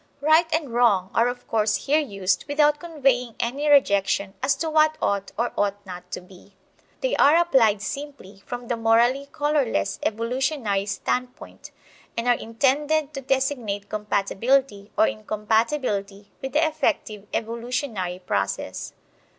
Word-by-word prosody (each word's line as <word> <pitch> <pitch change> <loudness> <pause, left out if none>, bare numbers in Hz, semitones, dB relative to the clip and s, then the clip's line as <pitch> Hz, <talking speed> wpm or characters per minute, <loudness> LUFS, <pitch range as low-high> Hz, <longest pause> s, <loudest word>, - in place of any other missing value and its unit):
"Right" 315 +3 +4
and 310 -6 -1
"wrong" 205 -6 +3
are 230 - +3
of 245 0 -5
course 215 -1 0
here 295 +3 +3
used 200 -10 -1
without 295 0 +3
conveying 270 -8 0
any 280 +6 -1
rejection 200 -7 +3
as 275 +2 +2
to 325 - -3
what 310 0 +3
ought 200 -1 -1
or 235 +2 -1
ought 205 0 -1
not 180 -1 -9
to - - -4
be. 185 +2 -18 0.5
They - - 0
are 290 +3 +6
applied 235 -12 +3
simply 275 -10 -7
from 245 0 -7
the 240 - 0
(morally 235 +5 +2
colorless) 290 - 0
evolutionary 230 -2 -1
standpoint, 250 +5 -4 0.5
and 230 +1 -1
are 245 - +6
intended 285 +6 0
to 275 - -5
designate 255 -7 -1
compatibility 210 +2 0
or - - +6
incompatibility 210 - -1
with 265 0 -5
the 305 +2 +3
effective 295 -10 -1
evolutionary 230 -5 -3
process. 100 - -2
240 Hz, 135 wpm, -24 LUFS, 205-285 Hz, 0.5 s, are